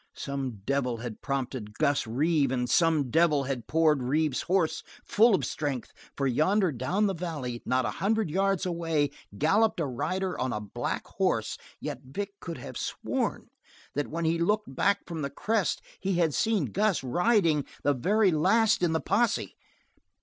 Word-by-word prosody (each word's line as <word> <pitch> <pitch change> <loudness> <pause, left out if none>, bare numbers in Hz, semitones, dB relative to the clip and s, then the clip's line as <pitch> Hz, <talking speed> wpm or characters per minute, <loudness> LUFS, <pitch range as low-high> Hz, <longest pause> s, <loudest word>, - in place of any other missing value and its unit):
Some 135 -7 -4
devil 130 -3 0
had 115 -2 -7
prompted 130 -6 -3
Gus 145 -5 +1
Reeve 140 +3 +2
and 125 -1 0
some 155 -6 +2
devil 155 -2 +3
had 130 -4 -4
poured 155 -3 +3
Reeve's 145 +2 +1
horse 180 -3 +1 0.2
full 220 0 +5
of - - -1
strength, 140 -5 -3 0.2
for 140 - 0
yonder 175 - +2
down 150 - 0
the 195 - +1
valley, 150 -9 -4
not 130 0 +2
a - - -1
hundred 215 -4 +1
yards 195 +1 +1
away, 165 -5 0 0.3
galloped 205 - +3
a 165 - +1
rider 185 +8 -2
on 130 0 0
a 105 - -2
black 105 -2 -4
horse; - - -1 0.2
yet - - -5
Vic 200 +10 -5
could 170 -2 -6
have - - -8
sworn - - -2 0.4
that 145 0 -1
when 165 +1 -3
he 165 +1 +1
looked 205 -4 0
back 200 +7 +1
from 165 -3 -5
the 140 - -2
crest 215 +5 -1 0.2
he 195 -1 -1
had 165 -3 +2
seen 220 +3 +1
Gus 205 -6 +1
riding 170 - +2 0.2
the 145 - +3
very 195 - +3
last 200 +8 +3
in 170 -2 +2
the 160 - 0
posse. 230 +3 0
160 Hz, 170 wpm, -28 LUFS, 135-190 Hz, 0.4 s, full